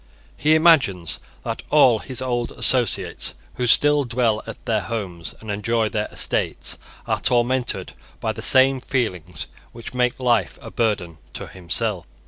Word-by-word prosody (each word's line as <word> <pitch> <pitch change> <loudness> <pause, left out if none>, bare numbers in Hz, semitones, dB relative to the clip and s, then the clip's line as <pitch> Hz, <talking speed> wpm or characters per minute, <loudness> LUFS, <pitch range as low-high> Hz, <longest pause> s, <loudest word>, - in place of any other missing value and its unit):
He 155 +1 +3
imagines 140 - +3 0.2
that - - -4
all 130 -7 +5
his 130 +2 -3
old 120 -2 -2
associates, 125 -5 +2 0.2
who 125 - 0
still 145 +4 +4
dwell 115 -3 0
at 115 - -9
their 110 -3 +1
homes 95 -5 -5
and 110 -1 -6
enjoy 110 +2 0
their 105 -1 -2
estates, - - -1 0.3
are - - -1
tormented 125 +1 +1 0.3
by - - -1
the - - -8
same 130 0 +5
feelings 90 - -2 0.3
which 115 +1 -9
make 125 0 0
life 120 -3 +1
a - - -10
burden 95 -8 -1
to - - -5
himself. 95 +1 -3
115 Hz, 145 wpm, -22 LUFS, 105-130 Hz, 0.3 s, all